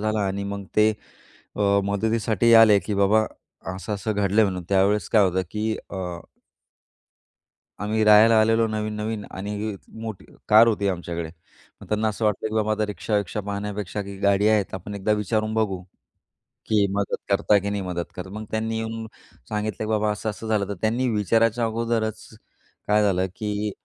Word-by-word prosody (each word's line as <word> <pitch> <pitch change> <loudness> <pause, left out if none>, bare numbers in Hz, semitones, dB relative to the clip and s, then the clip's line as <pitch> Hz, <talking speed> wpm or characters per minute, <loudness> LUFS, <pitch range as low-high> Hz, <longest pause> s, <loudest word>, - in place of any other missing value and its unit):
झाला 110 0 0
आणि 100 +1 -3
मग 100 0 -5
ते 105 0 +6 0.7
अ, 105 - 0 0.2
मदतीसाठी 110 +2 +1
आले 110 -3 +8
की 105 - -4
बाबा 100 +2 +3 0.5
असं-असं 100 +3 -3
घडलंय 105 +1 +3
म्हणून. 90 -2 -2
त्यावेळेस 100 -1 +2
काय 105 -2 +5
होतं, 95 0 +1
की 110 +1 -2 0.2
अ 95 - -4 1.8
आम्ही 110 +1 0
राहायला 110 +1 +7
आलेलो 115 +1 +3
नवीन-नवीन 105 0 -3
आणि 105 +2 -4 0.3
मोठी 110 -4 -6 0.2
कार 110 +2 +8
होती 100 -3 +1
आमच्याकडे, 85 -3 -4 0.5
मग - - -12
त्यांना 110 +1 +1
असं 110 +1 -3
वाटलं 105 +1 0
की 110 - -6
बाबा 110 0 +1
आता 110 0 0
रिक्षा-विक्क्षा 105 0 -2
पाहण्यापेक्षा 100 0 -4
की 100 0 -8
गाडी 100 +1 +3
आहेत, 105 -3 +1
आपण 95 +3 -6
एकदा 100 +2 0
विचारून 110 +1 -1
बघू, 100 -5 0 0.9
की 105 -2 +3
मदत 100 0 -1
करता 100 +1 +3
की 100 +1 -3
नाही 100 -1 -2
मदत 90 -2 -4
करत. 90 +1 -6
मग 110 +1 -6
त्यांनी 110 0 -2
येऊन 110 0 -4 0.4
सांगितलं 105 -1 -3
की - - -6
बाबा 105 -1 +1
असं, 105 +1 -3
असं 110 +2 -8
झालं. 105 -3 0
तर 100 - -3
त्यांनी 120 +4 +1
विचारायच्या 115 +3 +2
अगोदरच 115 -1 -2 0.6
काय 105 0 +3
झालं, 95 -2 +2
की 105 0 -2
105 Hz, 165 wpm, -24 LUFS, 100-110 Hz, 1.8 s, आले